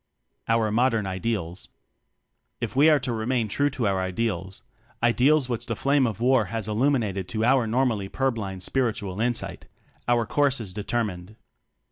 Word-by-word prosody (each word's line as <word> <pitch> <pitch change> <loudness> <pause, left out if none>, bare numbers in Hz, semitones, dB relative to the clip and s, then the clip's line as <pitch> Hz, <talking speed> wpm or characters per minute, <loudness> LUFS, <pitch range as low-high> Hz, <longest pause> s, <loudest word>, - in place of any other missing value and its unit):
Our 115 -1 +2
Modern 115 -1 +2
Ideals. 95 -2 -3 0.9
If - - -4
we 145 +4 +6
are 155 - +6
to 125 - -2
remain 115 +1 0
true 145 +8 +1
to 130 -4 -3
our 95 -1 +1
ideals 95 -1 -2 0.4
ideals 130 +4 +4
which 120 -1 -4
the 115 - -2
flame 140 +2 +2
of 110 -2 -4
war 125 -2 +3
has 110 +2 -3
illumined 110 -5 0
to 110 +4 -1
our 125 -2 +3
normally 115 -4 0
pur 135 +4 0
blind 95 -5 -5
spiritual 105 -6 -1
insight 120 0 -2 0.4
our 120 -1 +2
course 140 +2 +1
is 100 -5 -7
determined. 105 -2 -3
115 Hz, 155 wpm, -25 LUFS, 100-125 Hz, 0.9 s, we